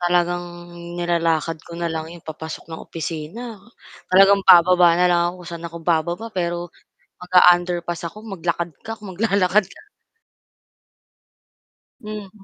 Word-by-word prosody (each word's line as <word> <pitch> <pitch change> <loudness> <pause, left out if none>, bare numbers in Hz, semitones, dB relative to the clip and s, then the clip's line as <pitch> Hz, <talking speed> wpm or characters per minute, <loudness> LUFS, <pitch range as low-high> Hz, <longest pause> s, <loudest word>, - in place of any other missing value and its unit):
Talagang 175 0 +1 0.5
nilalakad 165 -2 0
ko 170 +1 -11
na 170 -1 -2
lang 160 0 -4
'yon 170 0 -12
papasok 160 0 -7
ng 160 - -7
opisina, 170 - -6 0.5
talagang 195 +2 +6
bababa 175 -1 +7
na 180 - +3
lang 175 -1 +3
ako - - -4
kung - - -9
saan 170 0 -6
ako 165 - -11
bababa 170 +5 0
pero, 175 -2 -3 0.5
mag-a-underpass 175 -1 +3
ako - - -16 0.2
maglakad 170 -2 -3
ka, 225 0 -6
kung 195 -4 -9
maglalakad 200 -1 +2
ka. - - -15 2.2
Hmm. 210 -2 -7
175 Hz, 130 wpm, -21 LUFS, 170-185 Hz, 2.2 s, bababa